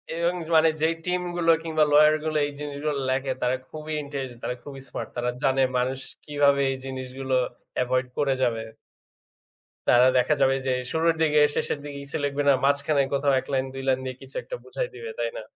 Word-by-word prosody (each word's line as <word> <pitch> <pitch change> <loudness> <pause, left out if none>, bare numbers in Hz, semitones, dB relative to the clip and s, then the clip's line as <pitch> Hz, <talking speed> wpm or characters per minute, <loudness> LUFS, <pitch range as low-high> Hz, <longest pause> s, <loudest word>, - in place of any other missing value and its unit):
এবং 170 +1 +1 0.2
মানে 160 0 +6
যেই 160 +1 +2
টিমগুলো 175 -2 +1
কিংবা 160 -1 +2
lawyer 150 +1 +7
গুলো 155 -1 0
এই 145 - -4
জিনিসগুলো 145 0 -3
লেখে 135 +1 0
তারা 125 +1 +2
খুবই 155 0 -6
intelligent, 135 -4 -6
তারা 125 - -2
খুবই 135 -2 -9
smart। - - -5
তারা 120 0 -1
জানে 135 -1 +3 0.2
মানুষ 130 +2 0 0.3
কিভাবে 145 -1 +3
এই 135 - -3
জিনিসগুলো 130 0 -5 0.5
avoid 130 +1 0
করে 140 -2 +2
যাবে। 115 -2 +1 1.3
তারা 125 +1 +7
দেখা 125 +4 +3
যাবে 135 0 +4
যে, - - +2 0.2
শুরুর 165 +1 +2
দিকে 150 -1 +4 0.2
শেষের - - -1
দিকে 145 -1 -7
কিছু 140 - -4
লেখবে 145 0 -1
না। - - +7
মাঝখানে 140 +1 +2
কোথাও 140 0 +2
১ - - -17
লাইন 130 0 +1
২ 135 0 -6
লাইন 130 -1 +3
দিয়ে 130 -1 -4
কিছু 135 +1 -14
একটা - - -6
বুঝায় - - -3
দিবে, 460 - -7
তাই - - 0
না? - - -6
140 Hz, 190 wpm, -25 LUFS, 130-155 Hz, 1.3 s, lawyer